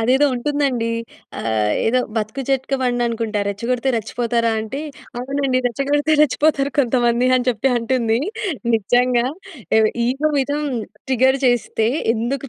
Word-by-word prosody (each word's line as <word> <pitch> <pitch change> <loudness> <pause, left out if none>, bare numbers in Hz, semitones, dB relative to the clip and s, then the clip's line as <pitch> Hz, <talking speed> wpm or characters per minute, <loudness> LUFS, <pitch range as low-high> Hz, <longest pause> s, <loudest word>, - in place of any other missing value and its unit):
అదేదో 260 +6 +3
ఉంటుందండి. 255 -3 0 0.5
ఆహ్, 110 -2 0 0.2
ఏదో 250 +3 +3 0.2
బతుకు 220 +5 -2
జట్కాబండనుకుంటా. 245 -5 0
రెచ్చగొడితే 235 +6 -2
రెచ్చిపోతారా? 230 +1 -1
అంటే 260 +7 -5 0.4
"అవునండి. 270 0 0
రెచ్చగొడితే 285 +5 0
రెచ్చిపోతారు 290 -1 +2
కొంతమంది" 240 -1 +2
అని 255 0 -1
చెప్పి 245 +2 +1
అంటుంది. 230 -1 +1 0.6
నిజంగా 245 +3 +2 0.5
ఏవి 215 -1 +4 0.2
ఇగో 280 +5 0
మీద 275 +2 0 0.5
ట్రిగ్గర్ 265 +1 +3
చేస్తే 240 -2 +1 0.3
ఎందుకు 250 +4 -3
245 Hz, 110 wpm, -20 LUFS, 230-270 Hz, 0.6 s, ఏవి